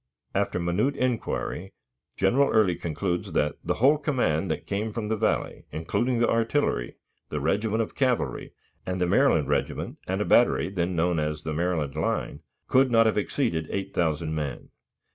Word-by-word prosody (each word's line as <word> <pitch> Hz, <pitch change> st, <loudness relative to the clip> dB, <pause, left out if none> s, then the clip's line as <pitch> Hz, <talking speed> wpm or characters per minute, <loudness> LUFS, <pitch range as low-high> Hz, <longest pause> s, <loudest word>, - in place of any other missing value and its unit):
After -, -, 0 dB
minute 90 Hz, +11 st, 0 dB
inquiry, 120 Hz, -7 st, -2 dB, 0.4 s
General 125 Hz, +9 st, +3 dB
Early 105 Hz, -6 st, +3 dB
concludes 85 Hz, +2 st, -3 dB
that 75 Hz, -1 st, +1 dB
"the -, -, 0 dB
whole 140 Hz, +5 st, +4 dB
command 125 Hz, -, 0 dB
that -, -, -3 dB
came 105 Hz, +2 st, -2 dB
from 105 Hz, -1 st, -4 dB
the 110 Hz, -, +1 dB
Valley, 110 Hz, 0 st, -1 dB
including 120 Hz, +10 st, -1 dB
the 120 Hz, -, +3 dB
artillery, 115 Hz, -, 0 dB, 0.3 s
the 75 Hz, -, -2 dB
regiment 105 Hz, +8 st, +1 dB
of -, -, -8 dB
cavalry, 130 Hz, -3 st, -1 dB, 0.3 s
and 90 Hz, 0 st, -3 dB
the 90 Hz, -, +2 dB
Maryland 90 Hz, -, +3 dB
regiment 75 Hz, 0 st, -2 dB
and -, -, -1 dB
a -, -, 0 dB
battery, -, -, +4 dB
then 90 Hz, -2 st, -1 dB
known 85 Hz, 0 st, +1 dB
as 75 Hz, +1 st, -2 dB
'The 80 Hz, -, -3 dB
Maryland 80 Hz, -4 st, -1 dB
Line,' 75 Hz, -2 st, -2 dB, 0.3 s
could 130 Hz, +1 st, +4 dB
not 115 Hz, -1 st, +5 dB
have 110 Hz, -, +2 dB
exceeded 105 Hz, -, -1 dB
8,000 85 Hz, -5 st, -1 dB
men." 75 Hz, -5 st, -4 dB
95 Hz, 160 wpm, -26 LUFS, 80-115 Hz, 0.4 s, not